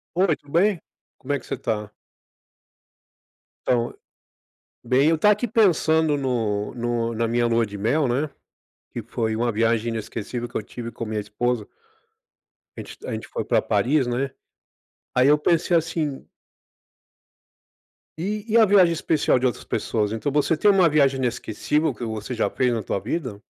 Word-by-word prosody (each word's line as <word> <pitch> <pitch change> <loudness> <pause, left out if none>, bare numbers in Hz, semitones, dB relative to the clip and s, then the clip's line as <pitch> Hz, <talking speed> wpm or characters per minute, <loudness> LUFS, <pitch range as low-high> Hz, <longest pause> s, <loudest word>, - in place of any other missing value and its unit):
Oi, 180 -3 +3
tudo 145 - -19
bem? 195 +3 +3 0.4
Como 135 - -6
é 140 - 0
que - - -17
você - - -3
tá? 105 -2 -3 1.8
Então, 120 -1 +1 0.9
bem, 130 +5 +3
eu 165 - +3
tava 210 +5 +5
aqui 210 +4 -1
pensando 160 - +3
no 115 -6 -1
no 120 -1 -1
na 115 +1 0
minha 120 +1 +1
lua 115 0 +2
de 105 -1 -7
mel, 135 +9 +1
né, 135 +5 0 0.6
que - - -5
foi 110 -1 -2
uma 120 +1 0
viagem 115 +1 +1
inesquecível 115 +1 -4
que - - -22
eu - - 0
tive 120 +1 -7
com 115 - -6
a - - -5
minha 110 0 -2
esposa. 105 +2 -2 1.1
A - - -4
gente - - -11
a - - -5
gente - - -5
foi - - -4
pra - - +2
Paris, 135 0 +1
né. 130 +3 -1 0.8
Aí, 125 +2 +4
eu 150 +1 +5
pensei, 170 +2 +2
assim 160 -4 -2 1.9
e 205 +5 -3
e - - +6
a 225 - +7
viagem 190 -4 +5
especial 155 -4 +1
de 130 - -1
outras 125 -4 -1
pessoas? 105 -2 -1
Então 115 +6 -2
você 150 +2 +2
tem 210 - +4
uma 190 -3 +5
viagem 140 -3 +3
inesquecível 130 +4 -1
que 120 - -8
você 110 +2 -5
já 115 - 0
fez 125 -1 +1
na 115 -2 -2
tua 100 - -2
vida? 125 - -4
125 Hz, 170 wpm, -23 LUFS, 115-160 Hz, 1.9 s, a